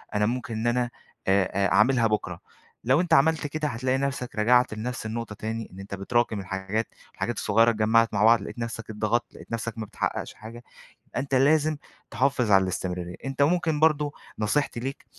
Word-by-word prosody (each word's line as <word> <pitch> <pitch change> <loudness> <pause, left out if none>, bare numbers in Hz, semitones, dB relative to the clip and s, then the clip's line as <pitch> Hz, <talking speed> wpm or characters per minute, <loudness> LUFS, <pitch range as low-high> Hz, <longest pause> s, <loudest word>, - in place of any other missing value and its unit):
أنا 105 0 +3
ممكن 120 +1 -2
إن 110 +2 -1
أنا 120 0 +1 0.4
آآ 95 0 +4 0.2
آآ - - 0
أعملها 115 +3 +4
بُكرا." 95 -5 -2 0.5
لو 130 +6 +4
أنتَ 175 -3 0
عملت 160 0 +4
كده 155 +1 -2
هتلاقي 130 +2 0
نفسَك 135 -3 -3
رجَعت 120 +2 +3
لنفس 115 +2 -5
النقطة 110 -1 -4
تاني، 110 +1 -5
إن 95 - -11
أنتَ 100 0 -6
بتراكم 110 +2 0
الحاجات، 95 +4 -3 0.2
والحاجات - - -3
الصغيرة 115 +3 +3
اتجمَّعت 115 +1 +3
مع 105 - +2
بعض، 115 -2 +6
لقيت 110 - -8
نفسَك 115 -1 -5
اتضغَّطت، 110 +2 -1
لقيت - - -13
نفسَك 115 0 -3
ما 110 - -4
بتحقِّقش - - -3
حاجة. 115 +2 -11 0.5
أنتَ 135 0 -1
لازِم 150 +3 +3 0.3
تحافِظ 125 0 +1
على 95 -1 +6
الاستمراريَّة. 90 -1 -4
أنتَ 135 +1 -1
ممكن 160 -1 +2
برضه 150 -2 +3 0.3
نصيحتي 120 +3 0
ليك، 135 +2 -5
115 Hz, 180 wpm, -26 LUFS, 105-135 Hz, 0.5 s, بعض